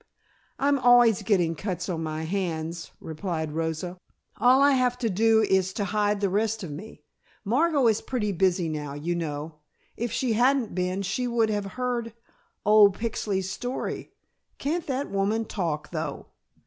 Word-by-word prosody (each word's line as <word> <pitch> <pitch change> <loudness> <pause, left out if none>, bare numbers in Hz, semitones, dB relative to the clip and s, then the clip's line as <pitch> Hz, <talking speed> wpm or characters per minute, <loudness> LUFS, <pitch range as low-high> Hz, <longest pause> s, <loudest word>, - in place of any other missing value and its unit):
"I'm 280 0 +2
always 245 -4 +5
getting 185 -5 +2
cuts 180 +1 -4
on 170 -4 -2
my 155 0 -3
hands," 165 -2 -3
replied 160 -1 -4
Rosa. 165 +3 -3 0.4
"All 255 +2 +5
I 285 +1 +6
have 250 -2 +2
to 230 -4 -1
do 220 +3 +4
is 190 -2 +2
to 205 - -2
hide 205 +1 0
the 200 - +3
rest 215 +2 0
of 165 - -6
me. 190 +10 -9 0.4
Margot 280 +5 +2
is 220 -2 +3
pretty 220 -6 -2
busy 180 -1 +1
now, 150 -2 -4
you 160 +4 -2
know. 155 -2 -4 0.4
If 235 -1 -3
she 250 -4 0
hadn't 250 +1 +2
been 185 +2 -1
she 220 +6 -1
would 230 -2 +1
have 205 -1 -1
heard 240 -3 -2 0.5
old 205 -2 +6
Pixley's 200 -4 -2
story. 245 +6 -4 0.5
Can't 320 +4 -2
that 275 +1 -2
woman 205 +3 0
talk 165 -8 -3
though?" 155 -4 -4
200 Hz, 160 wpm, -26 LUFS, 170-235 Hz, 0.5 s, I